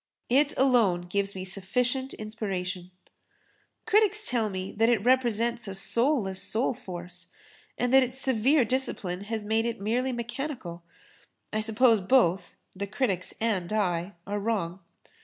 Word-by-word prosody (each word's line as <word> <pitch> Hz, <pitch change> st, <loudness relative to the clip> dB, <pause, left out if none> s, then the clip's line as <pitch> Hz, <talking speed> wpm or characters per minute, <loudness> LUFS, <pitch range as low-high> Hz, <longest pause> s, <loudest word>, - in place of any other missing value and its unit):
It 280 Hz, +4 st, +3 dB
alone 235 Hz, -10 st, +3 dB
gives 200 Hz, +3 st, -2 dB
me 185 Hz, 0 st, -5 dB
sufficient 250 Hz, +8 st, -1 dB
inspiration. 190 Hz, -4 st, -4 dB, 1.0 s
Critics 425 Hz, -1 st, +3 dB
tell 230 Hz, -3 st, 0 dB
me 190 Hz, -1 st, -5 dB
that 225 Hz, +2 st, +4 dB
it 225 Hz, -3 st, +1 dB
represents 240 Hz, -2 st, +2 dB
a 195 Hz, -, -4 dB
soulless 215 Hz, -2 st, +1 dB
soul 230 Hz, +4 st, 0 dB
force 180 Hz, -6 st, -8 dB, 0.5 s
and 245 Hz, +1 st, 0 dB
that 265 Hz, -, +8 dB
its 255 Hz, 0 st, -1 dB
severe 265 Hz, +1 st, +3 dB
discipline 205 Hz, -6 st, -2 dB
has 220 Hz, -1 st, -4 dB
made 220 Hz, +2 st, +1 dB
it 235 Hz, 0 st, -4 dB
merely 240 Hz, +6 st, 0 dB
mechanical. 240 Hz, -, -5 dB, 0.7 s
I 215 Hz, -, +1 dB
suppose 225 Hz, 0 st, +4 dB
both—the 190 Hz, -2 st, 0 dB
critics 200 Hz, -4 st, -1 dB
and 205 Hz, -6 st, -1 dB
I—are 185 Hz, -1 st, -2 dB
wrong. 195 Hz, -5 st, -2 dB
220 Hz, 130 wpm, -27 LUFS, 190-250 Hz, 1.0 s, that